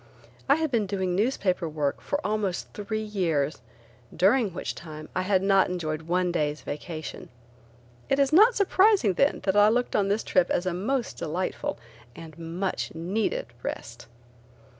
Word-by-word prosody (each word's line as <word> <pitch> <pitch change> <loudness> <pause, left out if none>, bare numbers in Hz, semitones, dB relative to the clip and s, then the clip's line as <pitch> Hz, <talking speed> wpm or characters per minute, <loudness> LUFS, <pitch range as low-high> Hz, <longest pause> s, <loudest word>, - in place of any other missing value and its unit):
I 280 - +7
had 315 -2 -1
been 220 -5 +1
doing 185 -2 -1
newspaper 190 -6 0
work 150 -2 -2
for 285 - -2
almost 210 -4 -2
three 215 +1 -3
years, 165 -10 -1 0.5
during 205 +4 +3
which 175 - -4
time 155 -2 -9
I 185 - +1
had 190 0 +1
not 195 -1 +4
enjoyed 160 -4 -3
one 175 +2 0
day's 150 -3 -1
vacation. 155 +2 -6 0.8
It 275 - +3
is 280 +1 +2
not 440 +8 +7
surprising 395 - +4
then 280 +10 +2
that 190 0 +1
I 205 +1 +6
looked 245 +2 0
on 200 - +2
this 205 +3 0
trip 185 -2 +2
as 175 - 0
a 185 - 0
most 230 +7 -2
delightful 170 +4 -3 0.4
and 160 -2 -10
much 170 +3 -3
needed 185 +7 -1 0.2
rest. 120 0 -6
190 Hz, 160 wpm, -26 LUFS, 165-215 Hz, 0.8 s, I